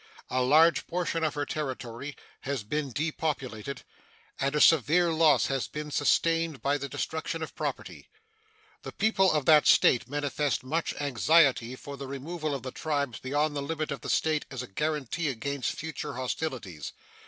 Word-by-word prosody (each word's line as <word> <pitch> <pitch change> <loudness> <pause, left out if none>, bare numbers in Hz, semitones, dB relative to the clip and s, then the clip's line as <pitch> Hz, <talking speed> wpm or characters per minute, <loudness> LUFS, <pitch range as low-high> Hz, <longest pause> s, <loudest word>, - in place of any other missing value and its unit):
A 130 - +1
large 155 +6 +4
portion 170 -1 -1
of 155 -2 0
her 145 0 -1
territory 135 -2 -5 0.2
has 135 -4 -3
been 145 +6 -2
depopulated, 140 -5 -3 0.6
and 140 +2 0
a - - +2
severe 165 +3 +5
loss 160 -1 +4
has 135 -2 -1
been 150 0 -6
sustained 165 +2 +1
by 145 +1 +1
the 140 0 -5
destruction 160 +3 -3
of - - -7
property. - - -5 0.7
The - - -8
people 195 -4 +3
of 150 -3 0
that 155 -2 +6
State 125 - +5
manifest 145 -1 -1
much 160 +6 -2
anxiety 135 - +3
for 140 +2 -9
the 135 0 -7
removal 150 +3 -4
of 135 - -6
the 130 - -5
tribes 145 -6 -2
beyond 145 +3 0
the 140 - -1
limits 155 +1 -3
of 140 -4 -4
the - - -6
State 155 -1 +1
as 130 -2 -5
a - - -8
guaranty 150 - -2
against 135 0 -2
future 160 -2 -5
hostilities. 125 - -4
145 Hz, 165 wpm, -28 LUFS, 130-160 Hz, 0.7 s, that